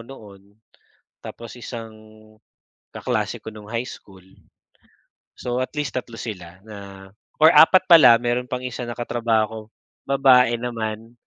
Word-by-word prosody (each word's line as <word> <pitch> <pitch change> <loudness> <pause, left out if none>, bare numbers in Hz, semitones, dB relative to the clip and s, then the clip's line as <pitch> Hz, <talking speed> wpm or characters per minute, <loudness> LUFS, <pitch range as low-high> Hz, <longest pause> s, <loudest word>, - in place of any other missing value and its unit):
noon, 105 -7 -13 0.8
tapos 115 -1 -10
isang 115 -2 -8 1.0
kaklase - - -3
ko - - -8
nung 105 0 -12
high 120 +1 -3
school. 95 -2 -14 1.1
So, 125 0 -4
at - - -12
least 135 -4 -3
3 120 -2 -6
sila 90 -5 -8
na 110 -2 -11 0.7
or 160 - +9
4 185 +3 +6
pala 130 -9 +8
mayro'n 120 +1 -1
pang 125 - -3
1 125 0 -5
na 120 - -6
katrabaho 115 -2 0
ko, 110 0 -8 0.5
babae 130 -3 +4
naman, 115 -1 -5
120 Hz, 135 wpm, -22 LUFS, 110-125 Hz, 1.1 s, or